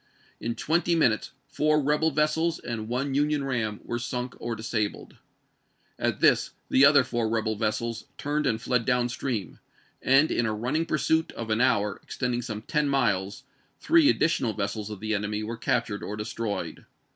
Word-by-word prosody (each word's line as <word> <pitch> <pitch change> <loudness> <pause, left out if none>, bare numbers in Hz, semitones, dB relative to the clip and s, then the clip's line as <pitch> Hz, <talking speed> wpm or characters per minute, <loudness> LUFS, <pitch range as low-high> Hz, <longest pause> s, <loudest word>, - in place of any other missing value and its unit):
In 115 0 -3
twenty 170 +2 +1
minutes 125 -10 +2 0.2
four 150 +2 +1
rebel 150 +3 +2
vessels 155 +2 +1
and 115 -2 -5
one 130 +4 -2
Union 145 +1 +1
ram 115 -6 -2
were 120 - -3
sunk 125 +1 -4
or 120 -1 -3
dis 110 +2 -7
abled. 105 -2 -2 0.8
At - - -1
this - - +3 0.2
the 135 - +5
other 140 -1 +6
four 120 -3 -1
rebel 110 -1 0
vessels 110 +1 -2
turned 150 0 -1
and 115 -3 +1
fled 125 0 0
down 125 0 +1
stream, 120 -4 -4 0.4
and 135 +4 +4
in 120 - +1
a 110 - -1
running 140 +9 -1
pursuit 160 +2 +1
of 115 -1 -5
an 110 +2 +2
hour, 105 -5 +2
extending 125 -2 -2
some 110 -3 -6
ten 150 +1 0
miles, 100 -8 0 0.4
three 330 -3 +5
additional 130 - +1
vessels 100 +2 -3
of 105 -2 -8
the 110 0 -1
enemy 105 +1 -2
were 115 +2 -4
captured 115 -2 -1
or 105 - -5
destroyed. 105 0 -4
120 Hz, 170 wpm, -27 LUFS, 110-145 Hz, 0.8 s, other